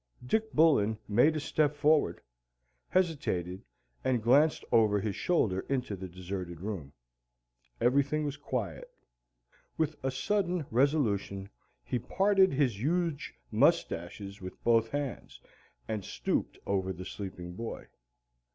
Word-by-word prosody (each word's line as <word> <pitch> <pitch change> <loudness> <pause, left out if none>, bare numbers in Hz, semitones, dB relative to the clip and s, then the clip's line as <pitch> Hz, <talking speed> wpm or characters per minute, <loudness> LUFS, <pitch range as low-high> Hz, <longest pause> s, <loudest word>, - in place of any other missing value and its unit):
Dick 220 - 0
Bullen 135 -10 +4
made 125 +10 +4
a - - 0
step 150 0 +1
forward, 150 +1 +2 0.7
hesitated, 115 - 0 0.4
and 125 -4 +1
glanced 145 +7 +4
over 105 -2 +4
his 100 -1 -2
shoulder 110 - +1
into 125 -6 -1
the 95 0 -7
deserted 90 -1 -6
room. 90 -8 -5 0.9
Everything 140 +4 +2
was 145 -1 -2
quiet. 130 -6 -4 0.9
With 160 -1 0
a 135 - +1
sudden 175 +4 0
resolution 110 -7 +1 0.3
he 120 - -2
parted 195 - +3
his 130 -7 +1
huge 165 +1 -1 0.2
mustaches 100 - +1
with 95 0 -9
both 115 -1 +3
hands 145 -1 -4 0.5
and 110 -3 -3
stooped - - -2
over 95 -1 0
the 90 0 -7
sleeping 90 -3 -7
boy. 115 +5 -6
120 Hz, 120 wpm, -30 LUFS, 100-150 Hz, 0.9 s, Bullen